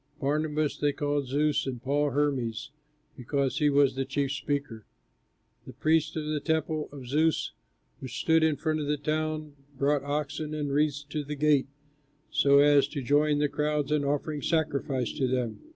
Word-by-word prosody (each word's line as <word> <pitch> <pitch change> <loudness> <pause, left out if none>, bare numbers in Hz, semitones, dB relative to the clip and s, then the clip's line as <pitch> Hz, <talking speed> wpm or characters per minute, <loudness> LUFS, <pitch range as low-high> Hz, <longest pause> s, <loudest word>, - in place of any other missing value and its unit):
Barnabas 150 +1 0
they 145 -1 +1
called 145 -1 -1
"Zeus," 145 +2 +1
and 125 -2 -4
Paul 145 +4 0
"Hermes," 130 -5 -1 0.4
because 135 +1 -1
he 150 -1 +3
was 140 -1 +4
the 135 +1 -2
chief 135 +1 -1
speaker. 140 -5 -3 0.8
The - - -9
priests 160 0 +1
of 155 -1 -3
the 155 0 -1
temple 155 -1 -1
of 140 -3 -9
Zeus, 155 +5 +1 0.5
which 130 -1 -6
stood 160 0 +3
in 160 -2 +3
front 155 +2 -1
of 150 - -3
the 150 0 0
town, 155 0 -2 0.2
brought 140 +1 +2
oxen 150 +1 -3
and 145 -2 -2
wreaths 145 0 +1
to 150 -1 -2
the 150 +1 -5
gates, 145 -2 +2 0.6
so 140 0 +4
as 145 0 +5
to 140 -4 -5
join 145 +3 +3
the 150 0 +2
crowds 150 0 -1
in 150 -1 +2
offering 145 +1 -2
sacrifice 140 -6 0
to 135 -3 -1
them. 125 -3 -2
145 Hz, 170 wpm, -28 LUFS, 140-150 Hz, 0.8 s, as